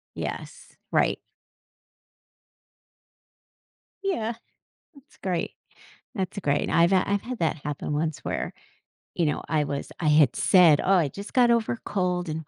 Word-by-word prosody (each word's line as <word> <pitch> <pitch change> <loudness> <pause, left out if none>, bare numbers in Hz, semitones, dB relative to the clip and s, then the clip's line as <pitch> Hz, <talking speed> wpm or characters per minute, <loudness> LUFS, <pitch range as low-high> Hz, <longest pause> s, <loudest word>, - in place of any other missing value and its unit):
Yes. - - -7
Right. - - +2 2.8
Yeah, 235 - -1 0.6
that's 280 0 -21
great. 180 -3 -2 0.6
That's 190 -2 -3
great. 145 -5 0
I've, 170 +3 +4
uh, 185 - +4
I've 200 0 0
had 250 0 -6
that 160 -1 0
happen 145 0 -4
once 155 0 -1
where, - - -4 0.6
you 170 - +1
know, 150 - -1
I 155 -1 +1
was 140 -1 -4
I 160 - +1
had 150 -4 +5
said, 170 -6 +5
"Oh, 190 - +3
I 175 -6 +4
just 200 +8 -9
got 245 -2 +4
over 235 -2 +2
a - - -10
cold," 180 -2 -1
and 155 +1 -4
180 Hz, 145 wpm, -26 LUFS, 155-200 Hz, 2.8 s, had